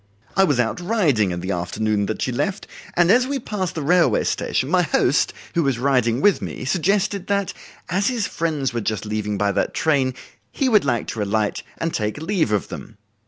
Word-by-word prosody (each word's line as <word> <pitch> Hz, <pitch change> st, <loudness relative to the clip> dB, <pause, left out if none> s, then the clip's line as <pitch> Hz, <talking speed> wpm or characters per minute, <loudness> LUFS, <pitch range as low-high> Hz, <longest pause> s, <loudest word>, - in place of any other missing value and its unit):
I 195 Hz, -, +5 dB
was 145 Hz, -8 st, +1 dB
out 115 Hz, +5 st, 0 dB
riding 170 Hz, -, +2 dB
in 85 Hz, -1 st, -3 dB
the 95 Hz, +2 st, -3 dB
afternoon 100 Hz, +3 st, -1 dB
that 110 Hz, -, -2 dB
she 130 Hz, -, -1 dB
left, 150 Hz, -, -2 dB, 0.3 s
and 175 Hz, +1 st, +4 dB
as 250 Hz, +3 st, +4 dB
we 280 Hz, +1 st, -1 dB
passed 205 Hz, -7 st, -3 dB
the 160 Hz, -, -3 dB
railway 175 Hz, +4 st, +3 dB
station, 130 Hz, -, -1 dB
my 180 Hz, +4 st, +3 dB
host, 155 Hz, -4 st, +2 dB, 0.2 s
who 170 Hz, -, +2 dB
was 135 Hz, -5 st, +1 dB
riding 125 Hz, -2 st, +1 dB
with 205 Hz, +2 st, +4 dB
me, -, -, -5 dB
suggested 195 Hz, +6 st, 0 dB
that, 200 Hz, -1 st, 0 dB, 0.3 s
as 195 Hz, +4 st, 0 dB
his 240 Hz, -6 st, 0 dB
friends 150 Hz, -6 st, -2 dB
were 120 Hz, -, -1 dB
just 110 Hz, 0 st, -2 dB
leaving 105 Hz, -1 st, -2 dB
by 100 Hz, 0 st, +1 dB
that -, -, -1 dB
train, 135 Hz, -5 st, +1 dB, 0.4 s
he 275 Hz, -, 0 dB
would 215 Hz, -, +4 dB
like 120 Hz, -4 st, 0 dB
to 110 Hz, -, -3 dB
alight 105 Hz, 0 st, 0 dB, 0.2 s
and 165 Hz, 0 st, -2 dB
take 105 Hz, +2 st, -2 dB
leave 160 Hz, -, 0 dB
of 105 Hz, -2 st, 0 dB
them. 110 Hz, -, -9 dB
140 Hz, 205 wpm, -22 LUFS, -, 0.4 s, I